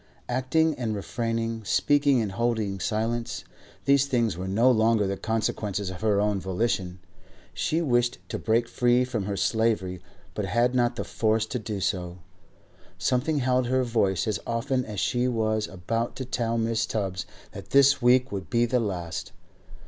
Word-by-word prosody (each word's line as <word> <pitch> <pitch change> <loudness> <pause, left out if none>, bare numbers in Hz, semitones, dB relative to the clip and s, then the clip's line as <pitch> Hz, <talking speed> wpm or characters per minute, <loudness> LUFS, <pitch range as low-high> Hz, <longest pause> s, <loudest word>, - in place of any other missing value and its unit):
Acting 130 +6 +1
and 110 -3 -1
refraining, 115 +2 -2
speaking 140 +4 +3
and 105 - -3
holding 110 -2 -1
silence, 115 +3 -2 0.4
these 140 0 +4
things 120 -7 +1
were 90 +2 -5
no 115 +7 +4
longer 110 -2 +3
the 100 0 -1
consequences 105 -2 -2
of 95 - -9
her 105 -2 +2
own 105 -1 +1
volition. 95 -1 -1 0.6
She 165 +2 0
wished 120 -4 +1
to - - -3
break 115 +1 +1
free 125 +1 +2
from 115 -6 -3
her 100 0 -3
slavery, 105 -4 0 0.3
but - - -2
had 120 +1 +2
not 120 -1 +2
the - - -3
force 110 0 0
to 115 +3 -4
do 105 -2 -4
so; 90 -2 -2 0.8
something 130 +5 +1
held 125 0 +1
her 130 +1 +2
voice 110 -6 +1
as 105 - 0
often 125 +2 -1
as 105 -3 -5
she 125 0 +1
was 110 -3 0
about 115 +6 -3
to 130 - -5
tell 115 -2 -1
Mrs. 115 0 0
Tubbs 95 -5 -2 0.2
that - - -10
this 140 0 +5
week 125 +2 +4
would 95 -5 -5
be 120 0 +3
the 125 +1 +1
last. 90 -7 -4
115 Hz, 165 wpm, -26 LUFS, 105-125 Hz, 0.8 s, this